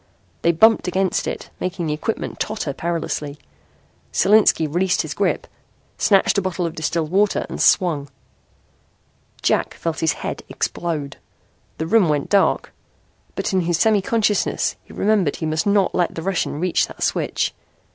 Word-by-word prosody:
They 170 - +4
bumped 220 +5 +4
against 185 +1 0
it, - - -5
making 185 -1 -3
the 150 - -1
equipment 155 +9 -4
totter 210 -10 -2
perilously. 150 -3 -3 0.7
Solinski 210 -5 +4
released 180 +4 +1
his - - -5
grip, - - 0 0.5
snatched 200 0 +3
a - - -1
bottle 185 -1 -2
of 165 - -3
distilled 160 0 -2
water 200 +2 +2
and - - -4
swung. 150 -6 +3 1.3
Jack - - +1
felt 165 -1 -3
his 160 -2 +2
head - - -5
explode. 155 -5 -3 0.6
The 160 - -2
room 200 -1 +3
went 145 -2 0
dark. 200 -1 +2 0.6
But - - -2
in 190 - +3
his 170 -1 0
semi 210 +3 +3
consciousness 210 0 0
he - - -17
remembered 200 -8 +1
he 160 - -4
must 155 +4 -1
not 200 -2 +3
let 175 -2 0
the 165 - -5
Russian 180 -5 -1
reach 180 +1 +1
that - - -7
switch. - - 0
175 Hz, 155 wpm, -21 LUFS, 160-195 Hz, 1.3 s, They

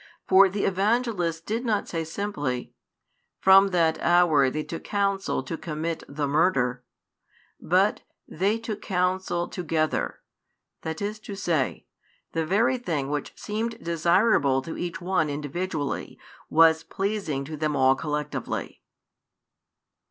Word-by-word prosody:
For 195 +1 +7
the 200 +2 -2
Evangelist 195 -4 0
did 225 +3 -2
not 215 -4 0
say 165 -1 -2
simply: 155 -8 -3 0.7
"From 195 +1 +7
that 165 -4 +1
hour 170 -6 +4
they 155 +3 -3
took 165 - -7
counsel 200 -6 -1
to 135 - -4
commit 160 +1 -3
the 145 0 -2
murder," 135 -5 +1 0.8
but: - - +2 0.3
"They 195 +7 0
took 225 -2 -5
counsel 180 -2 0
together;" 160 -3 -1 0.6
that 160 +4 -4
is 210 +1 -3
to 205 -2 -8
say, 170 -9 -1 0.5
the 160 -1 -1
very 235 +7 +2
thing 150 - -2
which 150 -1 -3
seemed 220 +2 -3
desirable 170 - +2
to 165 - -6
each 175 +1 -4
one 175 -4 +1
individually 145 +1 -3 0.3
was 160 0 +5
pleasing 195 -9 -2
to 155 +2 -6
them 150 0 -1
all 130 -1 +5
collectively. 150 -2 -4
170 Hz, 125 wpm, -26 LUFS, 150-195 Hz, 0.8 s, For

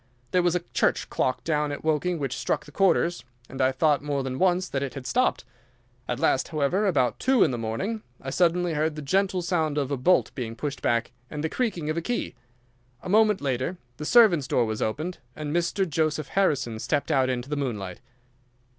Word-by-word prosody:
There 180 - +3
was 175 0 +2
a 180 - +1
church - - +1
clock 125 -1 0
down 150 -2 0
at 145 - -6
Woking 160 +3 +1
which 135 -4 -3
struck - - -1
the 150 - -13
quarters, 175 0 +2 0.2
and 130 +1 -5
I 130 0 +4
thought 145 +1 +2
more 145 -2 -2
than 130 0 -4
once 185 0 +2
that 135 - -2
it 140 -1 -4
had 135 -2 -7
stopped. 255 - +1 0.6
At - - -2
last - - +2
however 160 +7 +1
about 125 -10 +1
two 260 -1 +4
in 150 - +2
the 120 - -2
morning, 190 - -3 0.2
I 135 - -6
suddenly 175 +1 +2
heard 155 0 0
the 150 - -6
gentle 190 +4 +1
sound 160 -4 0
of 140 -1 -1
a 140 - 0
bolt 180 +9 +3
being 115 -4 -5
pushed 145 +2 -4
back 115 -1 0 0.2
and 150 0 -5
the 160 - 0
creaking 185 -11 -2
of 155 - -3
a - - 0
key. 240 +8 -2 0.7
A - - -6
moment 210 0 +4
later 135 +5 -1 0.2
the - - -6
servants' 180 - +5
door 125 -3 +2
was 110 -1 -3
opened, 155 +11 -2 0.2
and 150 0 -4
Mr. 175 +3 +1
Joseph 155 -2 -1
Harrison 140 - +1
stepped 145 +6 -1
out 130 -3 +3
into 125 0 -2
the 150 - -1
moonlight." 105 -10 -4
150 Hz, 210 wpm, -26 LUFS, 135-180 Hz, 0.7 s, servants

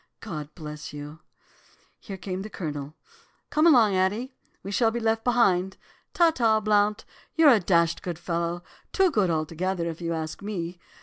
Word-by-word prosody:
God 155 -9 -6
bless 150 -3 -8
you!' 150 +2 -8 0.8
"Here 195 -3 -8
came 185 0 -5
the 210 - -7
Colonel. 150 -5 -6 0.6
'Come 310 +2 +4
along, 230 - +5
Addie, 210 +8 0 0.3
we 195 - -6
shall 225 +3 +3
be 235 +1 -3
left 225 0 0
behind. 190 -7 +2 0.4
Ta 340 -2 +5
ta, 225 -6 +2
Blount, 210 0 +1 0.3
you're 320 -3 +6
a 225 - +4
dashed 170 -3 +2
good 175 -3 -5
fellow, 170 0 -3 0.3
too 380 -2 +3
good 205 - +2
altogether, 170 +3 -1
if 165 0 -6
you 170 0 -2
ask 160 +1 -5
me. 180 -4 -5
190 Hz, 165 wpm, -26 LUFS, 170-220 Hz, 0.8 s, you're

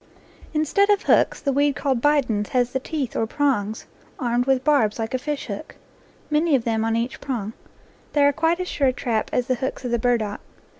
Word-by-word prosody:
Instead 315 +6 +2
of 410 -1 +3
hooks, - - +3
the 275 - -1
weed 285 0 +2
called 265 -3 0
"bidens" 250 -8 +2
has 245 -1 +1
the 265 - -1
teeth 275 -2 -4
or 225 - 0
prongs 225 -6 -1 0.3
armed 245 -1 0
with 265 -1 +2
barbs 270 -8 +2
like 225 +1 -3
a 255 - 0
fish 295 +2 -3
hook, - - -7 0.6
many 305 0 +3
of 250 - +1
them 225 -1 0
on 225 0 0
each 235 +2 -2
prong. 225 -6 -3 0.6
They 290 - +4
are 285 - +4
quite 330 +4 +1
as 365 - -3
sure 280 -5 +1
a 255 - +2
trap 225 -3 -1
as 250 - 0
the 255 - +1
hooks 260 0 -3
of 245 - -2
the 235 - +1
burdock. 220 -3 0
255 Hz, 210 wpm, -23 LUFS, 230-290 Hz, 0.6 s, They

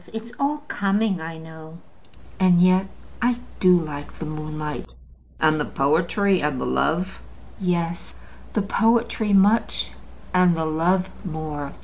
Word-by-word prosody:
It's 225 +1 -6
all 290 +1 0
coming, 200 -2 0
I 165 0 -6
know; 160 0 -11 0.6
and 180 -2 +5
yet 185 +2 +4 0.3
I 245 0 +2 0.2
do 180 -1 +6
like 145 -3 -7
the 160 - -5
moonlight." 155 - -6 0.4
"And 155 0 +3
the - - +1
poetry, 175 +7 +1
and 145 -3 -1
the - - -2
love?" 180 +4 0 0.4
"Yes. 175 -2 -2 0.4
The 210 - +1
poetry 225 0 +1
much, 200 +3 +3 0.4
and 180 -2 +4
the 160 - -1
love 175 +4 +1 0.2
more. 155 -5 -5
175 Hz, 130 wpm, -23 LUFS, 155-200 Hz, 0.6 s, do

